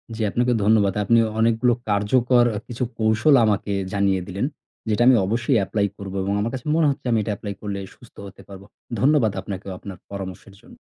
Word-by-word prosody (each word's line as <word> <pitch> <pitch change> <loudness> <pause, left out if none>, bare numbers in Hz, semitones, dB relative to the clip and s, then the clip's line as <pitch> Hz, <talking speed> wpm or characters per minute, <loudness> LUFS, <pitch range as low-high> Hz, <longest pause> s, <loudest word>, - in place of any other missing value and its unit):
জি, 110 - -5
আপনাকে 120 +2 +1
ধন্যবাদ। 105 -2 +3
আপনি 115 +3 +4 0.2
অনেকগুলো 115 +2 +3 0.2
কার্যকর 120 +4 +3 0.2
কিছু 120 +1 -4 0.2
কৌশল 110 +7 +3
আমাকে 105 -1 0 0.2
জানিয়ে 100 -2 +1
দিলেন 100 +6 -2 0.4
যেটা 110 +2 +1
আমি 130 - +7
অবশ্যই 115 +4 +1
apply 100 +2 0
করব 100 -1 -7
এবং 100 +1 -1
আমার 115 +3 -2
কাছে 130 -2 -6
মনে 160 -2 +3
হচ্ছে 140 0 -4
আমি 115 - +3
এটা 105 - -3
apply 100 -2 -6
করলে 100 -2 -4 0.2
সুস্থ 120 - -19
হতে 100 - -14
পারব। 95 0 -11 0.4
ধন্যবাদ 135 -5 +3
আপনাকেও 95 0 -7
আপনার 95 -3 -9
পরামর্শের 95 0 -8
জন্য। - - -17
110 Hz, 180 wpm, -22 LUFS, 100-120 Hz, 0.4 s, আমি